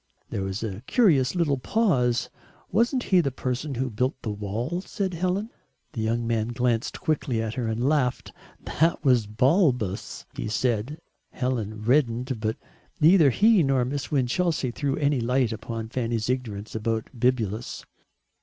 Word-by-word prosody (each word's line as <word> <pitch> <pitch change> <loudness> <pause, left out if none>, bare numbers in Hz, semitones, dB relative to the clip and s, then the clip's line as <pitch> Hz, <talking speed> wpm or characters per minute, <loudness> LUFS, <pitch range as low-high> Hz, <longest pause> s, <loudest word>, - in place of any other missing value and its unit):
There 100 - -2
was 95 +3 -3
a 100 -2 -4
curious 160 - +3
little 150 -6 +1
pause. 125 - +1 0.4
"Wasn't 240 +5 +2
he 185 -2 +4
the 140 - 0
person 130 +2 -3
who 130 0 -2
built 125 +5 -1
the 110 - -2
wall?" 110 - -3
said 195 -2 -3
Helen. 185 +6 -1 0.4
The 115 - -3
young 115 +2 0
man 115 -1 0
glanced 120 -1 -1
quickly 155 -8 -1
at 110 -1 -2
her 120 -2 -2
and 115 +3 0
laughed. 140 -4 0 0.3
"That 165 -1 +1
was 125 -5 +4
Balbus," 125 - +1
he - - -4
said. 120 +5 -1 0.3
Helen 110 -5 -3
reddened, 125 -1 +1
but 110 0 -1 0.4
neither 160 -1 +6
he 210 - +4
nor 135 -4 +2
Miss 140 +2 -3
Winchelsea 145 +1 0
threw 140 +2 -1
any 145 -2 +1
light 125 0 +1
upon 115 0 -5
Fanny's 115 -1 -1
ignorance 110 -5 -4
about 110 0 -2
Bibulus. 115 -2 -1
125 Hz, 150 wpm, -25 LUFS, 115-150 Hz, 0.4 s, neither